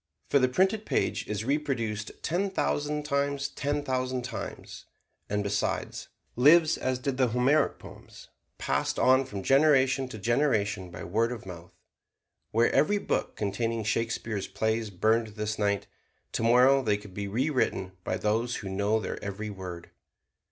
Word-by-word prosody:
For 140 - +5
the 130 -1 +3
printed 190 +9 +2
page - - -1
is 105 +1 -3
reproduced 115 -7 -1
ten 185 +4 0
thousand 150 -5 -1
times 140 -1 -1
ten 145 +1 -2
thousand 130 -2 -1
times, 120 -2 -7 0.4
and 105 0 0
besides, 100 0 -2 0.3
lives 155 +6 +6
as 130 0 -1
did 130 +1 -3
the 130 -2 +3
Homeric 125 +6 +2
poems, - - -13 0.3
passed - - -1
on 130 +1 +4
from 100 -6 -6
generation 135 -1 +4
to 125 - -8
generation 105 -5 0
by 85 -1 -8
word 115 +6 0
of 120 -5 -7
mouth. 85 -2 -10 0.8
Were 115 +2 +3
every 155 +10 +3
book - - -2
containing 115 +2 -2
Shakespeare's 110 -1 -2
plays 110 0 -1
burned 110 +3 +1
this 105 0 -3
night, 100 -1 +1 0.5
tomorrow 125 +4 +4
they 105 -5 +1
could 105 -2 -13
be 100 +1 -4
rewritten 125 -4 0
by 95 - -2
those 115 +4 0
who 100 - -5
know 100 +3 +1
their 105 - -5
every 105 +1 -4
word. 90 -3 -8
115 Hz, 150 wpm, -28 LUFS, 105-135 Hz, 0.8 s, lives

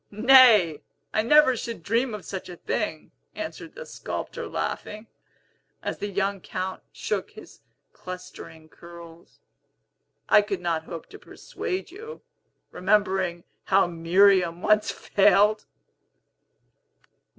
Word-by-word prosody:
"Nay; 215 - +6 0.3
I 215 - +2
never 280 +2 +5
should 230 -6 -6
dream 230 +3 0
of 195 -5 -10
such 190 0 -7
a 180 - -8
thing," 160 -2 -4 0.2
answered 320 0 -7
the - - -8
sculptor, - - -6
laughing, 215 +1 -5 0.8
as - - -4
the 205 - -3
young 200 0 -2
Count 185 +1 -5
shook - - -3
his - - -15 0.3
clustering 180 -3 -10
curls. 170 0 -15 0.9
"I - - +6
could 205 -2 -4
not 165 -2 -2
hope 165 -1 -8
to 415 - -11
persuade 370 -2 -6
you, 450 +5 -10 0.5
remembering 190 -3 0 0.2
how 195 0 +4
Miriam 175 +1 +3
once 215 0 +3
failed!" 210 +1 +2
195 Hz, 115 wpm, -25 LUFS, 175-220 Hz, 0.9 s, Nay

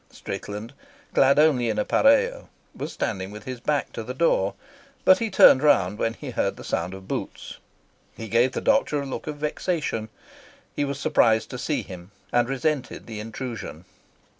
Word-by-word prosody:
Strickland, 105 +5 -7 0.4
clad 135 +1 +4
only 145 -6 +4
in 110 - -1
a, 285 - +3 0.3
was - - -5
standing 95 -3 -3
with 105 +1 -10
his 130 -2 -6
back 145 +4 -1
to - - -5
the 125 +3 -6
door, 115 -10 +2 0.5
but 185 - +7
he 230 -1 -1
turned 130 - +7
round 105 -9 +3
when 115 0 0
he - - -7
heard - - -1
the - - -10
sound 90 +3 -2
of 95 0 -12
boots. - - -5 0.6
He 115 - -6
gave 120 +3 +2
the - - -3
doctor 275 - +2
a - - -6
look 135 - -6
of 150 -1 -4
vexation. 150 -6 -2 0.7
He 145 - 0
was 140 0 -4
surprised 110 -5 +2
to - - -6
see - - -1
him, 90 0 -10 0.2
and 120 0 +2
resented 135 0 -2
the 110 -2 -7
intrusion. 110 -6 -7
125 Hz, 175 wpm, -25 LUFS, 110-150 Hz, 0.7 s, but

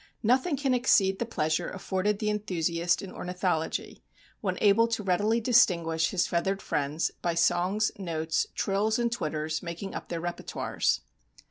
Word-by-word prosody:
Nothing 260 +7 +2
can 270 -1 +1
exceed 195 -6 +3
the 235 - -2
pleasure 155 -8 -1
afforded 195 +1 -1
the 210 +1 0
enthusiast 175 -4 0
in 195 - -7
ornithology 180 -3 -2 0.4
when 185 -3 -2
able 215 +2 +5
to 225 -2 -2
readily 205 +5 +2
distinguish 175 -9 +3
his 185 -3 +1
feathered 190 +3 0
friends 150 -1 -1
by 170 -1 0
songs, 185 +5 +2
notes, 160 -3 -1
trills, 205 +3 +1
and 235 -1 0
twitters 155 -7 -2
making 175 +3 -6
up - - -7
their 170 - -3
repertoires. 175 +1 -1
190 Hz, 145 wpm, -28 LUFS, 170-215 Hz, 0.4 s, able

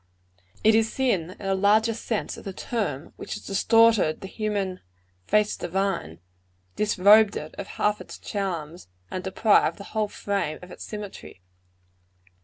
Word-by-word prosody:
It 220 - +6
is 220 0 +3
sin, 190 -10 0
in 200 - -8
the 195 - +1
largest 215 +4 +2
sense 220 -3 -2
of - - -11
the 195 - -6
term, 185 - -3
which - - -6
has - - -10
distorted 220 -4 +4
the - - -7
human 200 -3 -2 0.5
"face 210 0 +2
divine," 180 - -2 0.6
disrobed 210 +1 +5
it 155 +1 -7
of 200 - -5
half 210 0 +1
its - - -9
charms; 175 - -4 0.2
and 185 - -4
deprived 200 +3 +3
the 200 - -9
whole 215 -1 +1
frame 200 -7 -2
of 180 - -11
its - - -9
symmetry. 205 - -8
200 Hz, 150 wpm, -25 LUFS, 185-215 Hz, 0.6 s, It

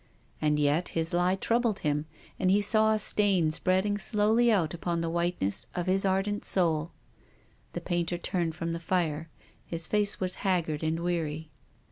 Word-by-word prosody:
And 150 -1 +2
yet 150 +4 +1
his 165 +1 -1
lie 180 +2 +2
troubled 230 +1 0
him, 150 0 -1 0.3
and 185 - +2
he 200 +2 +4
saw 220 +1 +3
a 215 - +2
stain 195 -6 +2
spreading 190 +5 0
slowly 220 +3 +3
out 175 -8 +1
upon 170 0 -2
the 165 0 -2
whiteness 170 - -1
of 175 - -2
his 190 +1 +1
ardent 195 +2 0
soul. 165 -3 +2 0.8
The - - -4
painter 175 -1 -1
turned 170 -2 -2
from 165 +1 -3
the 165 - -3
fire. 165 -2 -1 0.3
His 165 -1 -4
face 205 +1 0
was 185 -1 -1
haggard 170 -6 0
and 160 +1 -1
weary. 160 -3 -3
175 Hz, 165 wpm, -28 LUFS, 160-195 Hz, 0.8 s, he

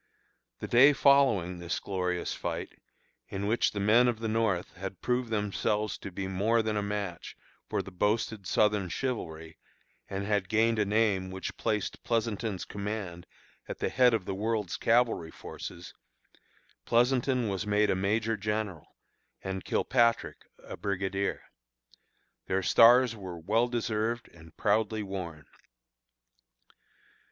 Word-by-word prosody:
The - - -6
day 135 +5 +7
following 130 -12 +3
this 85 0 -3
glorious 90 -2 -2
fight, - - -4 0.6
in 100 +1 -3
which 110 +3 +2
the 100 - -4
men 110 +5 +5
of 120 -2 +1
the 115 0 -3
North 110 -5 0
had 95 0 -7
proved 125 -1 -1
themselves 105 0 -1
to - - -7
be 95 +1 -4
more 110 +5 +1
than 110 -1 -1
a 105 - 0
match 100 -4 -4 0.3
for - - -1
the - - -10
boasted 105 +1 -1
Southern 105 -3 +2
chivalry, 80 - -4 0.5
and 100 0 -3
had 100 -3 0
gained 110 +1 +2
a 105 - +3
name 100 -3 +1
which 95 0 -5
placed 105 -2 -2
Pleasonton's 110 -4 -1
command 100 -4 -5 0.4
at - - -5
the - - -1
head 125 -2 +4
of 100 -5 -3
the 95 - -3
world's 105 -1 -1
cavalry 115 -8 +2
forces, 85 +1 -9 0.9
Pleasonton 125 0 +2
was 100 0 -3
made 105 0 +3
a - - +1
Major 110 +4 0
General, 105 -4 -4 0.5
and 95 -1 -4
Kilpatrick 115 -2 +1 0.2
a - - -8
Brigadier. 100 0 -2 1.0
Their 95 0 0
stars 120 +3 +6
were 95 -4 -7
well 110 +8 +1
deserved 115 -1 -2
and 80 -1 -17
proudly 110 +1 +1
worn. 90 -6 -6
105 Hz, 135 wpm, -29 LUFS, 95-115 Hz, 1.0 s, day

